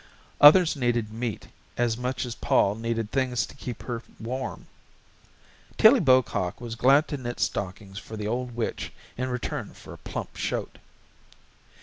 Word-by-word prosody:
Others 160 +3 +8
needed 120 -5 -1
meat 115 -1 -4 0.3
as 120 -2 +1
much 125 +2 -3
as 120 - -5
Pol 100 - +2
needed 115 0 -3
things 125 -5 0
to - - -14
keep 125 -3 -7
her 120 -2 -4 0.2
warm. 125 +2 -5 1.1
Tillie 235 +5 +7
Bocock 130 - +2
was 120 -2 -6
glad 135 +6 +4
to 145 - -3
knit 120 -2 -6
stockings 95 +1 -3
for 110 - -9
the 105 0 -3
old 120 +1 -3
witch 115 -2 -3 0.2
in 130 +1 -2
return 125 -1 -4
for - - -11
a - - -12
plump - - -6
shoat. - - -3
120 Hz, 150 wpm, -26 LUFS, 110-130 Hz, 1.1 s, Others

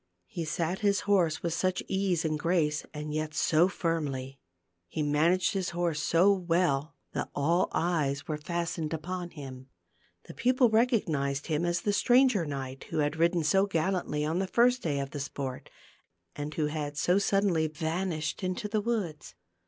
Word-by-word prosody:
He 165 - -5
sat 170 +3 -2
his 200 -1 +2
horse 180 -6 +2
with 170 -1 0
such 185 +2 0
ease 190 -4 0
and 155 -1 0
grace, 155 -3 0
and 150 0 -5
yet 155 0 -3
so 160 +3 +4
firmly; 140 -7 -3 0.5
he 155 - -2
managed 165 +7 +2
his 190 -2 -1
horse 170 -4 0
so 180 +5 +4
well, 165 -5 0 0.2
that - - -3
all 170 +6 +2
eyes 150 -5 0
were 155 -2 -3
fastened 165 0 -2
upon 175 +2 -5
him. 130 -5 -9 0.6
The - - -11
peo 250 +1 +2
ple 250 -2 +4
recognized 160 - +1
him 160 +1 0
as 175 0 0
the 205 - 0
stranger 245 - +4
knight 135 -2 -5
who - - -5
had 150 0 0
ridden 170 0 +2
so 190 +7 +3
gallantly 165 -4 -1
on 160 +4 0
the 190 - -1
first 245 +5 +3
day 150 -4 -1
of 140 0 -4
the 145 - -5
sport, 135 -1 -5 0.7
and 145 +1 -4
who 155 - +1
had 150 -1 -3
so 180 +6 +3
suddenly 195 -5 +2
vanished 160 +2 -3
into 185 +3 -2
the 210 0 0
woods. 175 - -3
165 Hz, 170 wpm, -29 LUFS, 150-185 Hz, 0.7 s, so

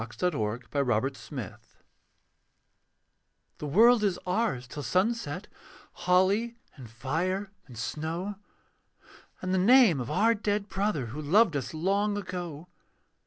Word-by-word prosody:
THE 115 - -5 0.2
SONG - - -12
OF 110 -1 -3
THE 140 -1 +1
CHILDREN 125 - -3 2.0
The 150 - -4
World 225 - +5
is 195 -4 +1
ours 180 - 0
till 145 - -7
sunset, 220 +9 -1 0.5
Holly 200 +6 +2 0.2
and 125 -5 -11
fire 175 - -2 0.2
and 125 -4 -12
snow; 160 - -3 1.1
And 185 0 -1
the 190 - +3
name 215 - +6
of 120 - -5
our 225 +5 +3
dead 205 -1 -1
brother 195 - -1
Who 125 +7 -6
loved 175 +4 +4
us 140 +2 -3
long 200 +5 +1
ago. 175 -5 -6
180 Hz, 125 wpm, -28 LUFS, 140-205 Hz, 2.0 s, name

